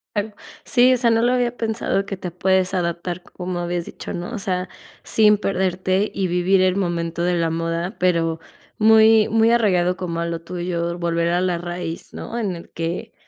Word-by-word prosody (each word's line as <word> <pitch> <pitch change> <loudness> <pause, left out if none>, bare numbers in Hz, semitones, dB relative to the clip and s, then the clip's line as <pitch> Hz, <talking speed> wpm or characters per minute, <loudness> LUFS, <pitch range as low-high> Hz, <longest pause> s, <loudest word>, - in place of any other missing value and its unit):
Tal 210 0 -2 0.3
sí, 250 +1 +5
o - - +2
sea, 235 -1 +2
no 225 - +3
lo 245 +2 +3
había 245 -1 0
pensado 220 -3 -1
que 195 - -5
te 180 -2 -6
puedes 190 +1 +1
adaptar 175 0 -2
como 180 -1 -5
habías 175 0 -2
dicho, - - -8
¿no? 175 +6 -5
O 230 - -4
sea, 185 -2 -2 0.3
sin 210 -1 +4
perderte, 190 +1 0
y 190 -1 -1
vivir 180 +2 +2
el 185 0 +3
momento 170 -3 -2
de 180 0 +1
la 165 -1 +1
moda, 165 +4 -2
pero 165 -3 +1 0.4
muy, 220 0 +6
muy 225 +1 +3
arraigado 185 -6 +2
como 170 -2 -4
a 170 - -1
lo 170 0 -3
tuyo, 175 0 -3
volver 170 -1 0
a 175 +1 +1
la 180 -2 0
raíz, 175 -1 -6
¿no? 235 - -6
En 200 -6 -2
el 170 - -11
que 170 +7 -4
180 Hz, 195 wpm, -21 LUFS, 170-210 Hz, 0.4 s, muy